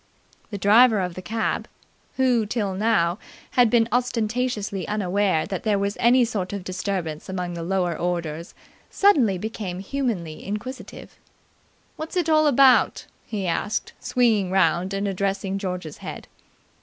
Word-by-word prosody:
The 205 - -5
driver 215 +3 +5
of 180 -2 -2
the 185 - -7
cab, 220 +5 -2 0.5
who 250 -5 +2
till 205 -3 -1
now 185 -3 +1 0.3
had 245 -2 +4
been 230 0 +3
ostentatiously 230 -4 -1
unaware 200 -4 +1
that 190 -3 -4
there 210 -2 +1
was 200 +1 -1
any 245 +1 +5
sort 205 -5 -3
of 200 -2 -4
disturbance 185 -4 -4
among 180 -2 -3
the 170 - -5
lower 175 -1 0
orders, 170 -1 -3 0.3
suddenly 265 - +3
became 205 -2 -5
humanly 195 - -3
inquisitive. 210 +6 -7 0.8
"What's 315 +3 -5
it 340 -3 +1
all 310 -1 +4
about?" 270 -2 +4 0.2
he 205 -4 -3
asked, 180 +5 -2
swinging 220 -7 +1
around 185 +1 +2
and 200 +1 -1
addressing 195 0 -2
George's 180 -5 -5
head. - - -8
200 Hz, 140 wpm, -24 LUFS, 180-235 Hz, 0.8 s, driver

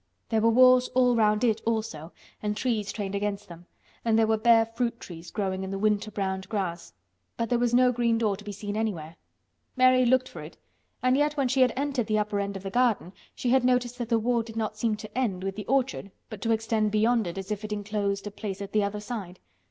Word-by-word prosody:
There 220 -1 +1
were 230 - +4
walls 255 +1 +6
all 250 -1 +4
round 215 0 +2
it 225 -2 +2
also 215 -9 -3 0.3
and 210 0 -2
trees 215 -4 -1
trained 200 -2 -4
against 205 0 -2
them, 175 0 -13 0.4
and 225 -1 +2
there 225 - +4
were 220 0 +2
bare 225 0 +5
fruit 235 +1 -3
trees 170 -1 -10
growing 190 -2 -2
in 190 - -5
the 195 - -3
winter 210 +1 +1
browned 190 -2 -3
grass—but 170 - -5
there 245 - +2
was 240 -1 +1
no 250 +1 +5
green 235 -1 +1
door 215 -3 +1
to 205 - -13
be 205 - -6
seen 205 +1 -5
anywhere. 175 -8 -3 0.6
Mary 255 0 +5
looked 260 +1 +3
for - - -9
it, - - -11 0.5
and 255 0 +4
yet 295 +1 +1
when 275 -2 +2
she 260 +1 +1
had 250 -1 +5
entered 270 -4 -1
the 215 -1 +1
upper 210 -1 -1
end 200 0 -3
of 190 - -11
the 195 - -5
garden 230 -6 +1 0.2
she 245 - -1
had 260 -1 +4
noticed 250 0 +1
that 235 -2 -4
the 230 - +3
wall 235 +1 +1
did 225 0 -10
not 220 -1 -2
seem 215 0 0
to 210 0 -11
end 210 -8 -1
with 195 0 -3
the 210 -1 -7
orchard 265 -5 0 0.2
but 215 -2 -8
to 230 - 0
extend 220 -1 +1
beyond 220 0 +2
it 170 - -6
as 195 +1 -6
if 210 0 -3
it 215 - -6
enclosed 205 -1 -2
a 205 - -5
place 200 -1 -6
at 200 -1 -6
the 210 -1 +2
other 200 +1 -2
side. 205 -5 -6
215 Hz, 240 wpm, -27 LUFS, 200-240 Hz, 0.6 s, walls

